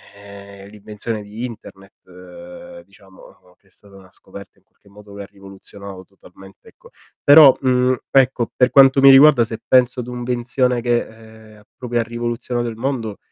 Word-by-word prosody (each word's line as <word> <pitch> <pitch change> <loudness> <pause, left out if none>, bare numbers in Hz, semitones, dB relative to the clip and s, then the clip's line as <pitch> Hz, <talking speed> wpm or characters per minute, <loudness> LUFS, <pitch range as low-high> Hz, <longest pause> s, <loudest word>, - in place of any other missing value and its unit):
ehm, 100 -1 -15
l'invenzione 105 +1 -8
di 105 +3 -10
Internet, 100 -4 -13
uhm, 260 - -14
diciamo, 95 -1 -21 0.2
che 100 - -35
è - - -30
stata 100 0 -21
una 95 -1 -19
scoperta 100 0 -15
in - - -33
qualche - - -33
modo 105 0 -17
che 100 - -10
ha - - -11
rivoluzionato 100 -1 -13
totalmente, 95 0 -20
ecco - - -22 0.3
però, 145 -2 +7
mhmm, 125 -1 0
ecco, 130 -3 0
per 125 -1 +2
quanto 135 0 +4
mi 135 - +7
riguarda, 135 -2 +5
se 115 0 -8
penso 125 0 +1
ad 125 0 -7
un'invenzione 125 0 -2
che, 120 0 -2
ehm, 110 -1 -18
ha - - -22
proprio 120 -1 -4
ha - - -1
rivoluzionato 120 +1 -5
il 115 - -9
mondo, 115 -4 -5
115 Hz, 170 wpm, -18 LUFS, 100-125 Hz, 0.3 s, però